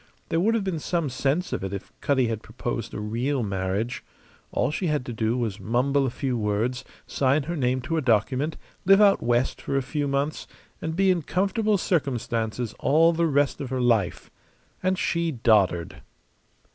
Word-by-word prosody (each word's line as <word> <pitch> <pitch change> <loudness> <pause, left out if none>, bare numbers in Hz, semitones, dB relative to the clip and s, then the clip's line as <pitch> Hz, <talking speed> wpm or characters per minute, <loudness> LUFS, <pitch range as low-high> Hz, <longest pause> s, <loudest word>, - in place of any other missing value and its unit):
There 165 - +1
would 220 +6 +2
have 220 - 0
been 185 -4 -2
some 170 -1 -1
sense 140 +7 0
of - - -2
it 95 - -3
if 100 - -7
Cutty 135 -3 +2
had 110 -1 -3
proposed 115 -2 -4
a - - -5
real 120 +5 -1
marriage. 100 +3 -2 0.5
All - - 0
she 175 +4 -2
had 150 -4 0
to 120 - -5
do 110 +2 0
was 110 -4 -2
mumble 130 +6 +1
a - - 0
few 130 +1 -2
words, 110 +3 -1 0.2
sign 140 +2 +1
her 170 +5 -4
name 130 -3 0
to 160 +6 -2
a - - +1
document, 130 +5 +1 0.3
live 195 +2 +6
out 205 -2 +5
West 120 +2 0
for 140 - -1
a 135 - 0
few 145 +2 -2
months, 140 +2 -1 0.3
and 160 0 -3
be 190 +1 +4
in 175 -2 +1
comfortable 200 - +1
circumstances 120 - -1
all 165 +4 +4
the 165 0 +1
rest 145 -2 +1
of 135 - -4
her 130 0 -2
life. 115 -7 +1 0.5
And 185 0 +1
she 170 -2 0
doddered! 105 -8 +2
135 Hz, 185 wpm, -25 LUFS, 115-160 Hz, 0.5 s, live